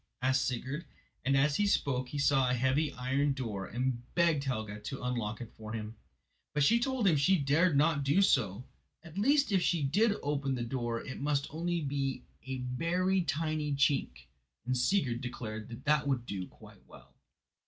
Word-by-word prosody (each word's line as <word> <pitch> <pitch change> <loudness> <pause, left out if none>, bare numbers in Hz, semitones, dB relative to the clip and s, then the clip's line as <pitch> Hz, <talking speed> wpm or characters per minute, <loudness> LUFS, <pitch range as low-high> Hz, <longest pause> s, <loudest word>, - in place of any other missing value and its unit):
asked 130 +1 +2
Sigurd, 135 +5 -3 0.4
and 135 +1 +2
as 140 +2 +3
he 205 - +2
spoke 130 -9 0
he 145 - -5
saw 135 -2 +3
a 125 - +2
heavy 135 +5 +1
iron 135 +3 0
door 110 -8 -4
and 125 +1 -2
begged 165 -5 +3
Helga 110 -5 -3
to 130 +6 -6
unlock 115 -4 -2
it 120 - -8
for 110 0 -8
him. 110 0 -5 0.6
But 150 - +3
she 230 +11 +5
told 260 -2 0
him 170 - +5
she 170 +7 +4
dared 145 +2 +3
not 150 -1 +3
do 145 +9 +3
so, 115 - +1 0.4
at 170 +2 -7
least 280 +3 +3
if 190 -2 +3
she 170 -3 +1
did 205 +10 +3
open 140 -2 -1
the 120 - -3
door 120 -1 -3
it 130 - -7
must 145 -1 +1
only 170 +2 -1
be 135 -3 -2 0.2
a 130 0 -3
very 175 +9 0
tiny 155 -1 -1
chink; 135 - +1 0.4
and 130 +1 0
Sigurd 125 -2 +1
declared 115 -1 -6
that 150 0 +2
would 130 -4 0
do 95 -5 -4
quite - - -17
well. - - -16
135 Hz, 180 wpm, -31 LUFS, 125-155 Hz, 0.6 s, she